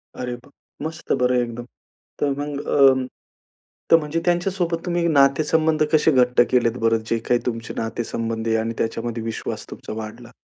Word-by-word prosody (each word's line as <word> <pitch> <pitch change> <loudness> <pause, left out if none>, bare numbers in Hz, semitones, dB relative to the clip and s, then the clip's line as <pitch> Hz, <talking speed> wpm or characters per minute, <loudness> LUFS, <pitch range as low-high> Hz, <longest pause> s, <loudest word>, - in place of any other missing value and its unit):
अरे 125 -1 -4
वाह! 120 +2 -11
अरे 150 +2 -9
मस्त 160 +1 -8
बरं 125 0 +3
एकदम. 120 0 -6 0.5
तर 145 - +1
मग 145 -1 -3
अ, 135 -2 +6 1.0
तर 165 - +9
म्हणजे 150 +2 -2
त्यांच्या 175 +2 +1
सोबत 170 -3 -2
तुम्ही 175 -1 0
नातेसंबंध 155 +2 +3
कसे 155 +1 +5
घट्ट 125 -3 +4
केलेत 120 -1 +2
बरं, 115 0 +4
जे 115 - +2
काही 120 - +4
तुमचे 115 -2 -3
नातेसंबंध 115 0 -3
आहे 115 - +2
आणि 115 +1 -2
त्याच्यामध्ये 115 0 -2
विश्वास 115 -1 -5
तुमचा - - -7
वाढला? 110 +2 -8
125 Hz, 165 wpm, -22 LUFS, 115-155 Hz, 1.0 s, तर